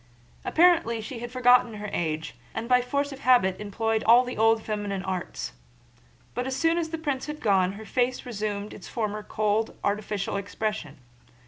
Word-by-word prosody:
Apparently 335 -9 +4
she 230 +3 -6
had 240 0 -6
forgotten 250 -2 +4
her 210 0 -5
age 160 -1 -2 0.2
and 225 +1 -3
by 250 0 +5
force 280 +3 -1
of 275 - -8
habit 240 -9 +4
employed 220 +2 -1
all 235 +3 +7
the 250 - -5
old 225 0 +3
feminine 205 -3 -3
arts. 180 - -4 0.8
But 245 +1 -2
as 265 - -2
soon 330 +3 +2
as 325 -1 -2
the 325 - -3
prince 290 -4 -2
had 300 0 -5
gone 190 -3 +2
her 220 +2 -9
face 250 +2 0
resumed 210 -3 -3
its 190 - -10
former 215 -2 -2
cold, 215 +1 -1
artificial 205 -1 -1
expression. 200 -5 -4
220 Hz, 175 wpm, -26 LUFS, 205-250 Hz, 0.8 s, all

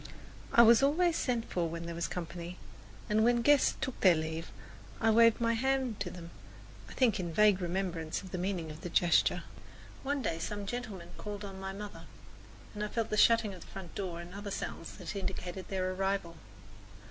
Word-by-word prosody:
I 235 - +8
was 230 +1 +7
always 325 +5 +3
sent 240 -3 0
for 170 -2 -1
when 170 +1 -5
there 170 - -4
was 170 0 -2
company, 175 0 -6 0.5
and 215 +1 +3
when 240 +1 +5
the 240 - +1
guests 290 0 +5
took 260 - -4
their 185 -3 +6
leave, 160 +1 -4 0.5
I 225 -1 +3
waved 230 0 +6
my 230 -1 +2
hand 260 -1 0
to 200 -2 -2
them, 170 -1 -9 0.6
I - - -9
think 245 -7 +2
with 180 - -2
a - - -5
vague 205 +1 +4
remembrance 175 -2 -2
of 185 - -10
the 180 - -3
meaning 175 -4 -2
of 155 +1 -10
the 175 - -5
gesture. 175 +1 +3 0.6
One 280 0 -1
day 165 -5 -1
some 205 +4 -4
gentlemen 200 -6 -5
called 205 0 -5
on 195 -1 -8
my 190 0 -4
mother, 205 +1 -8 0.7
and 210 -1 -4
I - - -1
felt 225 +1 -2
the - - +1
shutting 225 -1 +4
of 180 - -11
the - - -12
front 190 -4 -9
door 180 -4 -4
and 175 +1 -9
other 200 +1 -6
sounds 165 - -5
that 180 -3 -6
indicated 185 -1 -4
their 185 -1 -1
arrival. 195 -3 -1
195 Hz, 205 wpm, -32 LUFS, 175-225 Hz, 0.7 s, I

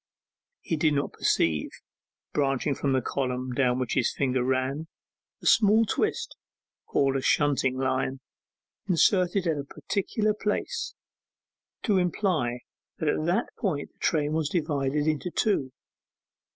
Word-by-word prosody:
He 165 - -2
did 150 -1 +2
not 140 0 -1
perceive, 80 -2 +1 0.6
branching 140 0 +1
from 135 0 -1
the 130 -2 +1
column 130 -1 -2
down 125 -1 +2
which 125 -2 -2
his 120 - +2
finger 130 -2 0
ran, 130 +4 -1 0.6
a - - -9
small 220 +1 +5
twist, - - -1 0.5
called 135 -1 +2
a - - -2
shunting 135 -2 +2
line, 130 0 -1 0.7
inserted 180 +1 +3
at 160 -3 0
a - - -3
particular 210 +8 -1
place, 215 - -2 0.9
to 205 -5 +3
imply 170 - 0 0.4
that 155 - 0
at 155 - 0
that 190 +8 0
point 160 -9 -2
the - - -42
train 150 -1 +1
was 155 -2 0
divided 150 -3 0
into 155 +3 0
two. 175 - 0
145 Hz, 135 wpm, -27 LUFS, 130-180 Hz, 0.9 s, small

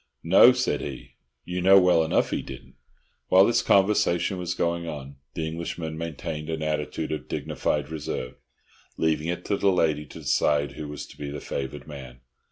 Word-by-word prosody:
"No," 95 +8 +8
said 125 - -1
he. 65 -2 -7 0.3
"You 90 0 -3
know 95 +2 +7
well 90 -3 +4
enough 80 - +1
'e - - -1
didn't." 65 -1 -11 0.5
While 95 +1 +6
this 120 - +2
conversation 95 -2 +2
was 90 0 -3
going 85 -1 -1
on, 70 -3 -7 0.2
the 80 - -2
English 85 +1 -5
man 80 -2 -5
maintained 80 -1 -5
an 80 -1 -3
attitude 75 0 -2
of 75 - -4
dignified 75 -1 -2
reserve, 70 -5 -4 0.6
leaving 80 0 0
it 90 +1 -3
to 100 - 0
the 100 0 +3
lady 75 -5 +1
to - - -11
decide 70 -1 +1
who 75 +1 -7
was 75 0 -7
to - - -16
be 70 -1 -4
the 70 0 -5
favoured 70 +1 -5
man. 65 -4 -10
80 Hz, 180 wpm, -26 LUFS, 75-90 Hz, 0.6 s, No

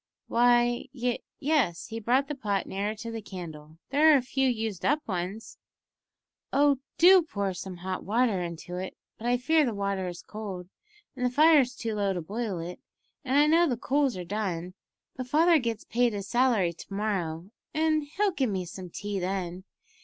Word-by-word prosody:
"Why, 240 +1 +3
y 245 -2 -1 0.2
yes," 275 - +1
he 225 0 -4
brought 255 +5 +2
the 295 - -3
pot 205 -8 -1
nearer 205 +3 -2
to 230 +2 -7
the 225 -1 -5
candle; 160 -6 -9
"there 305 +3 +6
are 295 - +7
a 260 - -1
few 265 +1 +1
used 220 -6 -3
up 300 +2 +1
ones." 190 +3 -4 0.9
"Oh, 280 0 +3 0.2
do 365 +2 +8
pour 200 - -3
some 180 0 -7
hot 185 +1 -4
water 220 -1 +1
into 175 +1 -6
it; 185 +1 -6 0.2
but 230 - -4
I 245 0 +3
fear 310 +6 +3
the 235 -6 -1
water 200 -2 -1
is 175 -1 -7
cold, 195 -4 -7 0.5
and 250 - -4
the 250 - +3
fire's 285 -2 +5
too 230 -3 -3
low 200 -2 0
to 180 - -3
boil 210 +2 -3
it, 170 +2 -6 0.4
and 270 0 +1
I 295 - +6
know 330 +3 +4
the 250 -5 -1
coals 270 -3 +1
are 180 - -5
done; 185 -3 -3 0.4
but 255 -1 -5
father 325 +4 +5
gets 230 -4 -3
paid 240 -1 +1
his 200 -1 -5
salary 235 -7 +2
to 170 - -13
morrow, 190 -4 -2 0.2
and 310 0 +2
he'll 390 +7 0
give 270 -9 0
me 190 -3 -2
some 180 +1 -8
tea 205 +2 -4
then. 185 0 -3
220 Hz, 190 wpm, -28 LUFS, 185-265 Hz, 0.9 s, do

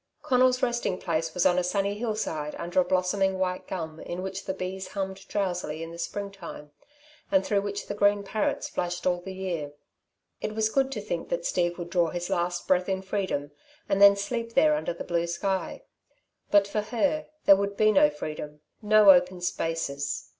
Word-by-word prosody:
Conal's 255 0 +3
resting 240 -6 0
place 165 -3 -1
was 180 - +1
on 180 0 +4
a - - 0
sunny 195 +2 0
hillside 210 -9 -3
under 175 +2 -1
a - - +5
blossoming 190 +1 +1
white 185 -1 -2
gum 160 -4 -5
in 180 +1 -5
which 190 +1 -5
the 190 - -2
bees 190 +1 -5
hummed 190 -1 -5
drowsily 175 -6 -2
in 165 - -7
the 170 - -10
spring 200 +3 -4
time 170 -6 -10 0.6
and 285 -1 +3
through 200 -1 +1
which 200 0 -4
the - - -4
green 205 0 +3
parrots 210 +1 -1
flashed 175 0 -3
all 180 -1 +1
the 190 - -7
year. 170 -6 -4 0.7
It 215 - -3
was 220 0 +2
good 270 +1 +1
to 215 - -4
think 210 - -4
that - - -2
Steve 175 - 0
would 175 -1 -7
draw 175 -2 +3
his 175 +1 -4
last 175 0 -1
breath 180 0 +2
in 190 0 -1
freedom, 190 -7 -2 0.4
and 195 0 +1
then 200 0 +9
sleep 230 +3 -4
there 155 -1 +5
under 155 +2 -2
the - - -6
blue 170 -1 -1
sky. 190 +3 -2 0.7
But 200 -1 +5
for 210 +1 -1
her, 265 +8 0 0.2
there 195 - +9
would 200 +1 -2
be 215 0 +5
no 190 -7 +5
freedom, 150 0 -7 0.2
no 210 -1 +7
open 180 0 +3
spaces. 165 -5 -2
190 Hz, 195 wpm, -27 LUFS, 175-205 Hz, 0.7 s, then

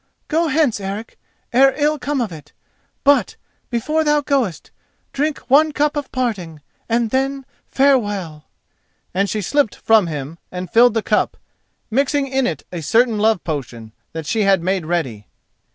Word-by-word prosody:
Go 330 +2 +2
hence, 300 -7 +1
Eric, 200 +3 -6 0.3
ere 270 +2 +5
ill 300 0 +1
come 275 0 -1
of 225 -5 -2
it; 155 -3 -12 0.5
but, 280 -7 +3 0.3
before 305 +7 0
thou 295 -1 +2
goest, 265 - -1 0.4
drink 295 +1 0
one 305 +4 +5
cup 295 0 0
of 290 -2 -4
parting, 185 - -3 0.3
and 230 -1 +1
then 270 +1 -1 0.2
farewell." 205 - +1 0.7
And 195 +2 +1
she 215 - -2
slipped 285 +3 +1
from 220 -5 +3
him 150 +1 -6
and 180 0 -6
filled 235 0 +5
the 225 - 0
cup, - - 0 0.5
mixing 280 +3 +1
in 265 -1 0
it 155 -5 -4
a 175 -2 -5
certain 225 +6 +2
love 220 -2 +2
portion 120 -8 -5 0.2
that 160 -1 -6
she 220 +7 0
had 195 -4 +3
made 185 -3 -1
ready. 130 -12 -2
225 Hz, 155 wpm, -19 LUFS, 175-275 Hz, 0.7 s, ere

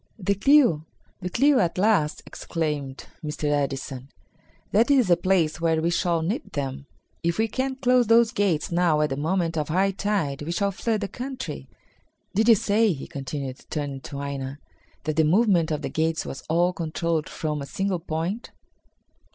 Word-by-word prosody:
"The 200 -1 +1
clew! 235 - +4 0.4
The 180 -1 -4
clew 275 +7 +4
at 175 -2 0
last!" 185 -6 +2
exclaimed 150 -5 -4 0.2
Mr. 150 0 -5
Edison. 135 -2 -2 0.6
"That 225 +5 +3
is 260 -8 +4
the 175 - +7
place 170 -2 +1
where 165 -1 +2
we 165 +2 +1
shall 170 -2 +1
nip 225 - -3
them. 135 -1 -4 0.3
If 170 0 0
we 225 +1 +2
can 265 +4 -2
close 250 -2 +3
those 230 0 +5
gates 185 -7 0
now 170 -3 +3
at 150 -2 +1
the - - 0
moment 165 +2 0
of 150 - -3
high 190 +4 +2
tide 195 -8 -1
we 165 +3 -3
shall 200 +2 0
flood 220 +2 -1
the 200 - -1
country. 260 +4 -6 0.6
Did 220 +4 +3
you 230 - +9
say," 210 0 +2
he 135 - -7
continued, 135 -1 -6
turning 145 -3 -3
to 140 -2 -6
Aina, 140 -1 -4 0.5
"that 155 +1 -2
the 160 - +5
movement 175 0 +3
of 155 -2 -2
the - - -2
gates 160 0 0
was 135 - -6
all 175 +3 +2
controlled 165 -1 -2
from 150 -2 -3
a 140 - -6
single 190 +4 -1
point?" 165 +7 -3
170 Hz, 175 wpm, -25 LUFS, 150-205 Hz, 0.6 s, you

